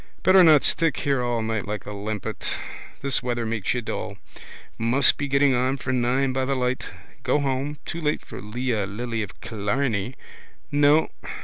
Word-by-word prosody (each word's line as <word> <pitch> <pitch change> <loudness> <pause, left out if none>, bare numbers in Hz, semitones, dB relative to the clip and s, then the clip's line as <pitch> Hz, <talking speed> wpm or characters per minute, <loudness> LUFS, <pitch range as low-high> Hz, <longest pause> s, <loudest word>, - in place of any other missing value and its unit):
Better 185 0 +7
not 155 -4 +7
stick 165 -3 +2
here 140 -3 +1
all 120 -2 0
night 110 -3 -2
like 105 -1 -4
a 105 - -6
limpet. 105 0 -4 0.5
This 140 -1 +2
weather 120 -2 -2
makes 110 0 -1
you 120 - -2
dull. - - -4 0.6
Must 125 +4 +4
be 145 - -3
getting 140 0 +3
on 130 +2 +1
for 130 0 -3
nine 130 +2 +1
by 130 0 0
the 135 +1 0
light. 125 0 -1 0.3
Go - - +2
home. 140 +1 -1
Too 170 - -5
late 150 -1 -1
for - - -8
Leah, 110 -1 -2
Lily 115 +3 -3
of 100 -2 -7
Killarney. 110 +1 -1 0.6
No. 145 +2 +4
125 Hz, 175 wpm, -24 LUFS, 110-140 Hz, 0.6 s, Better